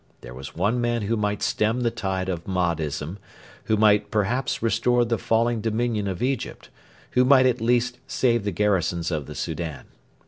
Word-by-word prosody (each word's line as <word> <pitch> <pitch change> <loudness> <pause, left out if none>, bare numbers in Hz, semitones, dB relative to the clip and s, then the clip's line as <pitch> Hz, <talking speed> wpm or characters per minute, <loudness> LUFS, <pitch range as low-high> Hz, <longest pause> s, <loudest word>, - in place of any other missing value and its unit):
There - - -10
was 65 +4 -9
one 105 +8 +1
man 120 -2 0
who 110 +3 0
might 105 -1 -1
stem 110 +3 +1
the 120 -1 +1
tide 95 -5 -2
of 85 -3 -3
Mahdism, 85 -3 -1 0.5
who 110 - +2
might 105 -1 +4
perhaps 110 +5 -1
restore 120 +2 +2
the 115 -1 -1
falling 115 0 +1
dominion 110 -1 -1
of 95 +3 -3
Egypt, 130 -1 -3 0.4
who 125 - +4
might 130 0 +6
at 125 -2 +2
least 120 +1 +1
save 120 -4 +1
the 105 - -1
garrisons 90 -3 0
of 75 -3 -3
the 75 - -8
Soudan. 80 -3 -4
105 Hz, 175 wpm, -24 LUFS, 90-120 Hz, 0.5 s, might